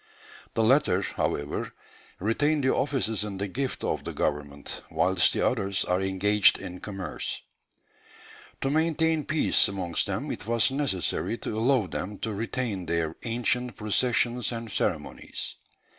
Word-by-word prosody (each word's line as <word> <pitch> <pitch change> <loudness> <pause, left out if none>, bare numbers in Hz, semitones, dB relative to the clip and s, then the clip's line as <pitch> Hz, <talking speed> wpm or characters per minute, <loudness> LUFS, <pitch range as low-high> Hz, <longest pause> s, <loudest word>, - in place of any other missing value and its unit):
The 115 - +3
latter, 110 -6 +4
however, 75 -4 -2 0.5
retain 145 +9 +2
the 130 - +3
offices 125 -7 0
in 100 -2 -5
the 100 +1 -2
gift 130 +7 -3
of - - -1
the - - -5
government, 75 -1 -3
whilst 95 0 +3
the - - +1
others 100 0 +1
are 90 +1 +1
engaged 95 +2 +4
in 90 +1 -7
commerce. 95 -3 -4 1.2
To 135 - +1
maintain 160 0 +2
peace 155 -6 +4
amongst 95 -4 -1
them - - -2
it - - -6
was 115 +2 +3
necessary 120 - -1
to 110 - -4
allow 120 0 +3
them 95 +3 -4
to 110 - -3
retain 110 -3 -2
their 80 -1 0
ancient 120 +1 0
processions 120 +3 +1
and 115 -2 -5
ceremonies.... - - -2
110 Hz, 140 wpm, -27 LUFS, 95-125 Hz, 1.2 s, latter